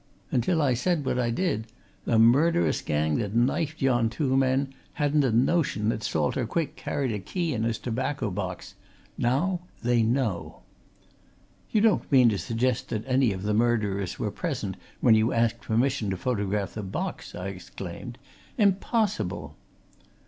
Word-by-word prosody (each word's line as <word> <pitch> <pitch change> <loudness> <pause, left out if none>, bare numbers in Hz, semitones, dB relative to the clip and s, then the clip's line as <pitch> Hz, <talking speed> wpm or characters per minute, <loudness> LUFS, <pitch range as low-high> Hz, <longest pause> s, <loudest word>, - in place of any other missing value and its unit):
Until 160 +6 +2
I 135 -3 +3
said 155 +4 0
what 125 - 0
I 120 -1 +1
did, 115 - -1 0.4
the 115 - +2
murderous 115 - +4
gang 75 0 0
that 105 -1 -3
knifed 140 +6 +1
yon 120 -4 +3
two 130 +2 0
men 135 +1 +1 0.2
hadn't 150 -2 +2
a 130 - +2
notion 120 -3 +2
that 110 - -1
Salter 100 - 0
Quick 165 +4 -2
carried 135 -4 -2
a 105 - -2
key 170 - -2
in 110 - -2
his 115 0 0
tobacco 125 -1 -2
box! 90 -1 -5 0.4
Now 160 +10 +1 0.2
they 120 0 +3
know." 115 -5 -1 1.1
"You 215 - +2
don't 220 -7 +2
mean 130 -4 +6
to 100 -3 -1
suggest 125 +1 -1
that 110 -1 -2
any 130 -3 +3
of 95 -1 -5
the 105 +1 0
murderers 105 -4 0
were - - -2
present - - -3 0.3
when 115 - +6
you 110 +2 +3
asked 115 0 +1
permission 120 -1 0
to 95 - -2
photograph 100 -2 -1
the 110 - -4
box!" 95 -1 -5
I 90 +2 -4
exclaimed. 95 +5 -8 0.4
"Impossible!" 190 - 0
120 Hz, 155 wpm, -27 LUFS, 105-135 Hz, 1.1 s, mean